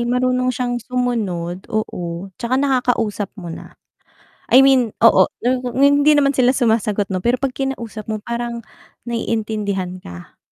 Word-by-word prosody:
marunong 255 0 +1
siyang 245 0 -2
sumunod 210 -8 -3
oo 185 -3 -4
'tsaka 245 +2 0
nakakausap 245 -6 0
mo 175 -4 -7
na. - - -11 0.7
I 260 +2 +7
mean 260 -5 +3
oo 230 - +6 0.2
n 250 -1 -1
hindi 285 +2 +5
naman 280 -1 +3
sila 255 -1 +2
sumasagot 215 -4 +1
'no 185 - -1
pero 240 +6 +1
pag 275 -1 0
kinausap 235 -5 -5
mo 215 -1 -4
parang 235 0 -4 0.4
naiintindihan 210 -5 -3
ka. 85 - -12
235 Hz, 135 wpm, -19 LUFS, 205-255 Hz, 0.7 s, I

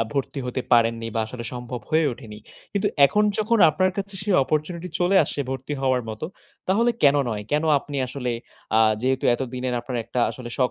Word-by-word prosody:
আ - - +4
ভর্তি 140 +1 -2
হতে 125 +1 -2
পারেননি 115 -1 +3
বা 115 - +1
আসলে 120 +1 -7
সম্ভব 125 -1 -6
হয়ে 160 0 +3
ওঠেনি। 110 -4 -10 0.3
কিন্তু 200 0 0 0.2
এখন 210 +8 +1 0.2
যখন 220 +1 +2
আপনার 185 +3 +1
কাছে 200 0 -4
সেই 200 -2 +1
অপরচুনিটি 155 +5 -2
চলে 180 +2 +3
আসছে 145 - -4
ভর্তি 135 +2 -4
হওয়ার 130 -2 +2
মতো, 110 +8 -5 0.4
তাহলে 230 +5 +3
কেন 145 0 +6
নয়? 105 -1 -3
কেন 150 +2 +2
আপনি 145 0 -7
আসলে 125 -1 -4 0.5
আ - - +6 0.2
যেহেতু 130 0 0
এতদিনের 125 0 -3
আপনার 125 0 -5
একটা 125 - -2
আসলে 120 -2 -8
শখ 125 -1 +2
130 Hz, 190 wpm, -24 LUFS, 120-170 Hz, 0.5 s, কেন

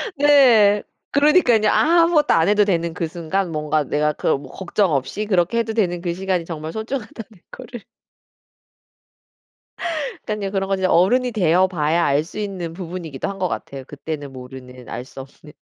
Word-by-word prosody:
네. 250 -8 +5 0.3
그러니깐요. 285 -7 +4
아무것도 330 -1 +3
안 165 +2 +3
해도 210 0 +4
되는 170 -4 -1
그 165 -1 -3
순간 170 +3 -3
뭔가 150 -1 0
내가 150 +2 0
그 - - -5
뭐 140 - -12
걱정 190 0 -1
없이 140 +10 -2
그렇게 190 +2 +1
해도 225 -1 -2
되는 175 -6 0
그 175 -1 -2
시간이 185 -2 -2
정말 160 -1 -6
소중하다는 220 0 -6 0.3
거를 245 -3 -10 2.4
그러니깐요. 210 -2 -3
그런 195 -1 -1
건 195 - 0
이제 190 - 0
어른이 245 +10 +3
되어 185 -3 +3
봐야 165 -1 0
알 140 +2 +2
수 180 - -9
있는 185 -5 -5
부분이기도 170 -5 -6
한 195 - -5
것 185 - 0
같아요 135 -1 -6
그때는 145 -1 -7
모르는 125 -1 -11
알 120 - -6
수 135 - -10
없는. 145 +3 -15
185 Hz, 340 characters per minute, -21 LUFS, 155-215 Hz, 2.4 s, 네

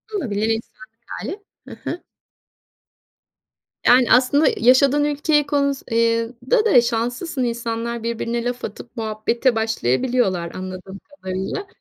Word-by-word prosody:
Olabilir, 220 - -1
insanlık 225 +1 -5 0.2
hâli. 365 - -6 0.2
Hı - - -9 0.2
hı. 350 - -7 1.8
Yani, 245 0 +5
aslında 265 +5 +4
yaşadığın 270 +4 +4
ülkeye, 295 0 +1
konus 280 -2 0
eee, 230 0 +2 0.2
da 450 -3 +4
da 250 - +6
şanslısın. 245 +5 -2
İnsanlar, 235 -1 -3
birbirine 235 0 -2
laf 245 0 -3
atıp 240 - -10
muhabbete 225 +3 0
başlayabiliyorlar 220 - 0
anladığım 185 +1 -7
kadarıyla. 190 - -5
235 Hz, 110 wpm, -21 LUFS, 225-275 Hz, 1.8 s, da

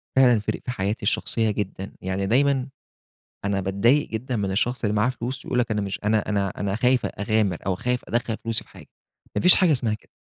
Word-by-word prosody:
فعلًا 125 -4 +5
فرَق 105 - -3
حياتي 105 -3 -2
الشخصية 110 +1 +1
جدًا، 100 -1 -4
يعني 95 +1 -2
دايمًا 135 +4 +2 0.8
أنا 100 -1 0
باتضايق 100 +10 +2
جدًا 120 +3 -3
من 100 -2 -1
الشخص 120 +6 -1
اللي 105 0 +1
معاه 105 +3 +3
فلوس 130 +1 -5
يقول 125 - -1
لَك 120 -2 +1
أنا 105 - 0
مش 100 -1 -3
أنا 105 -1 +1
أنا 100 -2 +1
أنا 100 +2 -3
خايف 125 +2 +2
أ - - -1
أغامر 100 -4 0
أو 95 - +1
خايف 125 +6 -1
أدخَّل 120 -1 -1
فلوسي 115 -1 0
في - - -25
حاجة. - - -14 0.5
مافيش 180 - +7
حاجة 180 -5 +4
إسمها 120 -6 +1
كده. 105 - -13
110 Hz, 205 wpm, -24 LUFS, 100-125 Hz, 0.8 s, مافيش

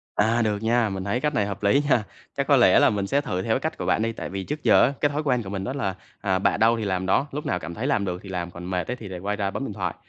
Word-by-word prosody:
À, 110 +3 +2
được 105 -2 0
nha, 115 0 +2
mình 95 -1 -4
thấy 100 +6 -1
cách 150 +3 0
này 105 - +1
hợp 100 0 -6
lý 115 +8 +4
nha. 120 -5 +3 0.3
Chắc - - 0
có - - +5
lẽ - - +6
là - - +5
mình 100 -2 -1
sẽ 140 +7 +2
thử 90 -9 -3
theo 110 +4 0
cái - - +1
cách 160 +3 -3
của - - -4
bạn - - +2
đi, 115 +1 0
tại - - -6
vì 95 0 -4
trước 150 +7 -5
giờ - - +6
á 140 - +2
cái 145 - +3
thói 150 +2 -2
quen 125 -5 +1
của 95 - -7
mình 95 -1 -4
đó 130 - -3
là, 100 -10 -2 0.3
à, 95 -2 +1
bạ - - +2
đâu 115 +1 +4
thì 110 - -3
làm 95 -1 -1
đó, 115 +9 +2
lúc 150 +2 -5
nào 90 - -1
cảm 85 - -7
thấy 120 +9 -3
làm 110 -8 +1
được 90 -1 -3
thì 100 - -10
làm 90 -2 -4
còn 85 +1 -9
mệt 90 -1 -2
ấy - - -1
thì 110 - -9
lại 95 -2 -6
quay 100 +3 -2
ra 100 -1 -2
bấm 135 - -4
điện 105 - -5
thoại. 90 -4 -3
105 Hz, 350 wpm, -24 LUFS, 95-125 Hz, 0.3 s, lẽ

